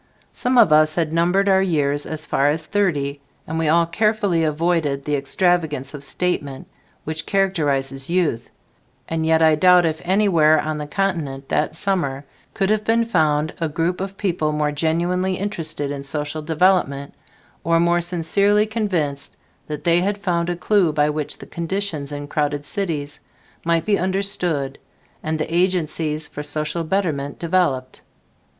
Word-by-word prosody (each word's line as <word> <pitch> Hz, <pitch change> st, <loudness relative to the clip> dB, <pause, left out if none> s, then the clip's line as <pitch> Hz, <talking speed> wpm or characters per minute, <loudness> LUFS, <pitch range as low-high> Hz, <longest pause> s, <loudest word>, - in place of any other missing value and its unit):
Some 250 Hz, +1 st, 0 dB
of 215 Hz, -10 st, +6 dB
us 155 Hz, 0 st, +4 dB
had 160 Hz, -2 st, -1 dB
numbered 180 Hz, +4 st, +2 dB
our 190 Hz, -1 st, +4 dB
years 145 Hz, -6 st, 0 dB
as 155 Hz, -1 st, -3 dB
far 140 Hz, -1 st, +1 dB
as 155 Hz, +1 st, -1 dB
thirty, 145 Hz, -9 st, -1 dB, 0.2 s
and 160 Hz, +1 st, -3 dB
we 165 Hz, -, 0 dB
all 170 Hz, +2 st, +4 dB
carefully 205 Hz, -1 st, +1 dB
avoided 155 Hz, -3 st, 0 dB
the 150 Hz, -, 0 dB
extravagance 150 Hz, -1 st, 0 dB
of 145 Hz, -1 st, -8 dB
statement 145 Hz, -5 st, -2 dB, 0.4 s
which 155 Hz, 0 st, -5 dB
characterizes 145 Hz, -9 st, 0 dB
youth, 170 Hz, -10 st, 0 dB, 0.6 s
and 160 Hz, -1 st, -1 dB
yet 160 Hz, 0 st, +4 dB
I 160 Hz, -1 st, +6 dB
doubt 180 Hz, +2 st, +5 dB
if 160 Hz, -1 st, -1 dB
anywhere 175 Hz, -5 st, +4 dB
on 155 Hz, 0 st, -2 dB
the 150 Hz, -, -5 dB
continent 150 Hz, -7 st, -2 dB
that 155 Hz, +1 st, 0 dB
summer 155 Hz, -8 st, -1 dB, 0.3 s
could 195 Hz, -1 st, +1 dB
have 215 Hz, 0 st, +1 dB
been 230 Hz, +2 st, +2 dB
found 155 Hz, -8 st, +1 dB
a 165 Hz, -, 0 dB
group 170 Hz, +4 st, -1 dB
of 195 Hz, 0 st, -5 dB
people 170 Hz, -6 st, 0 dB
more 150 Hz, 0 st, 0 dB
genuinely 175 Hz, +5 st, 0 dB
interested 165 Hz, -7 st, -3 dB
in 140 Hz, -1 st, -4 dB
social 145 Hz, +2 st, -4 dB
development 155 Hz, -3 st, +1 dB, 0.5 s
or 165 Hz, 0 st, +2 dB
more 170 Hz, +1 st, +3 dB
sincerely 200 Hz, +5 st, +2 dB
convinced 185 Hz, -11 st, -2 dB, 0.3 s
that 150 Hz, -1 st, -5 dB
they 170 Hz, 0 st, +3 dB
had 200 Hz, +2 st, 0 dB
found 175 Hz, -3 st, -1 dB
a 175 Hz, -, -1 dB
clue 180 Hz, -1 st, +2 dB
by 150 Hz, 0 st, +2 dB
which 150 Hz, -1 st, -3 dB
the -, -, -11 dB
conditions 170 Hz, -4 st, -4 dB
in 145 Hz, 0 st, -5 dB
crowded 145 Hz, -1 st, -1 dB
cities 150 Hz, -6 st, -3 dB, 0.4 s
might 165 Hz, -1 st, +1 dB
be 205 Hz, -2 st, +2 dB
understood 180 Hz, -7 st, -1 dB, 0.4 s
and 155 Hz, 0 st, -2 dB
the 155 Hz, +2 st, -3 dB
agencies 160 Hz, -4 st, 0 dB
for 145 Hz, -, -7 dB
social 150 Hz, +3 st, -2 dB
betterment 155 Hz, -6 st, -1 dB
developed. 165 Hz, -7 st, 0 dB
160 Hz, 155 wpm, -21 LUFS, 150-185 Hz, 0.6 s, of